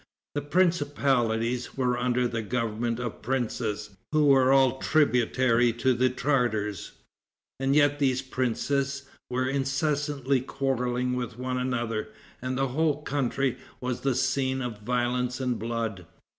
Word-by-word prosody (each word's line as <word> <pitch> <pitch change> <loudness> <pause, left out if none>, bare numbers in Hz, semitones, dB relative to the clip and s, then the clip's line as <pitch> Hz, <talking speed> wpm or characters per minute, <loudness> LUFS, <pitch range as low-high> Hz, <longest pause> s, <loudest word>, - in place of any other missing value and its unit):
The 145 - -1
principalities 140 -8 +1
were 125 -2 +1
under 125 0 +1
the 115 -1 -3
government 115 +1 -2
of 120 -2 -5
princes 110 -4 -2 0.2
who 155 -1 +3
were 135 -2 +5
all 135 -1 +4
tributary 125 -4 +3
to 130 +3 +2
the 130 +1 +2
Tartars, 120 - -1 0.7
and 135 +1 +1
yet 145 -1 +4
these 130 -2 +1
princes 135 +2 -1 0.3
were 130 +1 0
incessantly 140 0 0
quarreling 125 -2 -1
with 125 -2 -4
one 125 0 -2
another, 120 -4 -2 0.3
and 130 +1 -2
the 135 0 +1
whole 150 +2 0
country 135 -2 -1 0.2
was 125 -1 -3
the 135 -2 +1
scene 130 +1 0
of 120 -5 -4
violence 125 +2 0
and 125 -3 -1
blood. 110 -5 -3
125 Hz, 130 wpm, -27 LUFS, 120-135 Hz, 0.7 s, were